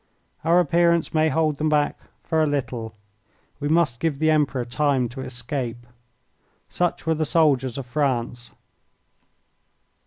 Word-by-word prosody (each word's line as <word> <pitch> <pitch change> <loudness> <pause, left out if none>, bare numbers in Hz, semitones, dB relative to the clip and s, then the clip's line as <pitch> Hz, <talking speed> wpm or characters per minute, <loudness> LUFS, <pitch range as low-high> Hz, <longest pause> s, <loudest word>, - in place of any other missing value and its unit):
"Our 170 +3 +4
appearance 170 0 +2
may 155 0 +3
hold 155 0 0
them 155 0 +1
back 150 -1 +1 0.2
for 160 -1 +1
a 155 - +3
little. 125 -6 -3 0.6
We 145 - -2
must 150 -6 +2
give 160 -4 -1
the 155 +2 +2
Emperor 140 -5 +1
time 130 0 +1
to 125 +3 -8
escape." 120 -1 -5 0.8
Such 175 -1 -1
were 160 - +2
the 155 0 -1
soldiers 140 -6 +2
of 135 - -5
France. 120 -2 -2
145 Hz, 135 wpm, -23 LUFS, 125-160 Hz, 0.8 s, Our